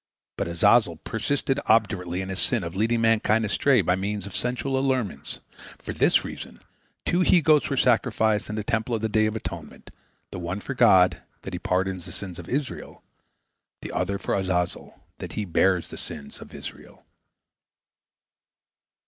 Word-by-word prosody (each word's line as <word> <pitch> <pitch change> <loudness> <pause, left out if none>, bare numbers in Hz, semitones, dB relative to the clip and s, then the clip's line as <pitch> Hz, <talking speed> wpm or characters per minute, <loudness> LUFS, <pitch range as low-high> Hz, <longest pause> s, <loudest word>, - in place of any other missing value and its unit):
But - - -2
Azazel 85 +2 +3
persisted 135 - -1
obdurately 100 -5 +2
in 95 - -7
his 95 0 -2
sin 120 -6 +3
of 85 +1 -6
leading 115 +3 +1
mankind 115 -1 +3
astray 125 +3 +3
by 90 0 +2
means 100 +1 -3
of 100 - -7
sensual 125 +2 -1
allurements. 130 - -2 0.4
For - - -6
this - - +3
reason - - -8 0.5
two 175 - +1
he 180 0 +5
goats 155 -2 +3
were 140 - -1
sacrificed 110 -4 +2
in 105 - -3
the 105 - -3
Temple 110 +3 -1
on 110 - -3
the 110 - 0
Day 110 0 +3
of 110 - -3
Atonement, 85 -6 -7 0.4
the - - -6
one 90 +3 -3
for 140 - -5
God, 95 -8 +5 0.2
that 95 - -7
He 90 - -3
pardon 95 +1 -1
the 85 - -10
sins 90 -4 -7
of 85 - -9
Israel, 135 0 -4 0.8
the - - -6
other 100 +2 -1
for 95 - -3
Azazel, 90 -2 -2 0.2
that - - -7
he 105 - -2
bear 90 +1 +3
the - - -10
sins 70 -1 -9
of - - -11
Israel. - - -11
105 Hz, 170 wpm, -25 LUFS, 90-120 Hz, 0.8 s, he